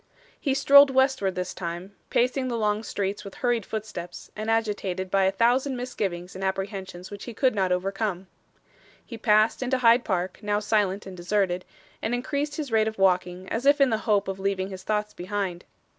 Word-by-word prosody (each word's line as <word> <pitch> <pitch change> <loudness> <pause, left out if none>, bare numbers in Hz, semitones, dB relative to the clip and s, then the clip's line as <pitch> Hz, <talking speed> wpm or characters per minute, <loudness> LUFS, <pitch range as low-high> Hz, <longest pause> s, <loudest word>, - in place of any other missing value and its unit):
He 275 -3 0
strolled 280 +1 +7
westward 265 -8 +2
this 180 0 -3
time, 180 +2 -6
pacing 255 +2 +1
the 240 -2 -2
long 210 -1 +1
streets 200 -2 -3
with 200 - -9
hurried 240 -4 0
footsteps, 210 -5 -6
and 215 +1 -4
agitated 205 -5 -1
by 195 -1 +3
a 190 - +3
thousand 250 +6 +2
misgivings 195 -8 -4
and 190 - -7
apprehensions 190 -1 -4
which 200 -1 -8
he 240 - -8
could 260 +2 +2
not 190 -3 0
overcome. 195 +1 -1 0.8
He 235 - -8
passed 215 +2 +3
into 260 0 +1
Hyde 240 0 +5
Park, 185 -2 -2
now 205 -1 0
silent 210 -2 0
and 190 -1 -8
deserted, 180 0 0 0.4
and 240 - 0
increased 285 +4 -2
his 295 -5 -4
rate 220 -1 +3
of 220 - -4
walking 180 -1 +1
as 245 +5 -1
if 290 +1 +6
in 275 -3 +4
the 220 - +1
hope 205 -2 +3
of 195 0 -4
leaving 195 0 -1
his 190 -1 -7
thoughts 210 0 -2
behind. 185 -1 -4
205 Hz, 190 wpm, -26 LUFS, 190-235 Hz, 0.8 s, strolled